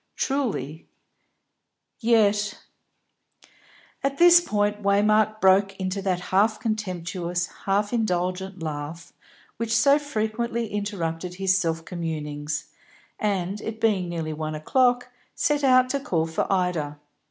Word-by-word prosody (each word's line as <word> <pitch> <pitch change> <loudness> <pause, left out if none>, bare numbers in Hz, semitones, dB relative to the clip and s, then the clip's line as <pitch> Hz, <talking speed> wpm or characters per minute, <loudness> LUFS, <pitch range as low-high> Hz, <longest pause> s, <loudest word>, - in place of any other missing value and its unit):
Truly; 205 - -2 1.1
yet 210 -3 +2 1.5
At 275 0 -1
this 345 +1 +8
point 210 -7 0
Waymark 215 +2 +3
broke 195 0 +3
into 190 +1 -2
that 185 -2 0
half 215 +3 +3
contemptuous, 180 -5 -2 0.2
half 205 +3 +1
indulgent 185 -4 -1
laugh 155 +1 -6 0.4
which 230 0 0
so 280 +5 +5
frequently 235 -4 -2
interrupted 180 -4 -3
his 190 0 +2
self 165 -3 -1
communings, 150 -3 -4 0.5
and, 200 -1 -1
it 220 0 -5
being 200 -6 +1
nearly 165 -2 -3
one 155 0 -4
o'clock, 245 - +1 0.2
set 295 -1 +1
out 255 -1 +5
to 280 - 0
call 165 -11 0
for 160 +3 -2
Ida. 175 -6 0
195 Hz, 115 wpm, -25 LUFS, 170-220 Hz, 1.5 s, this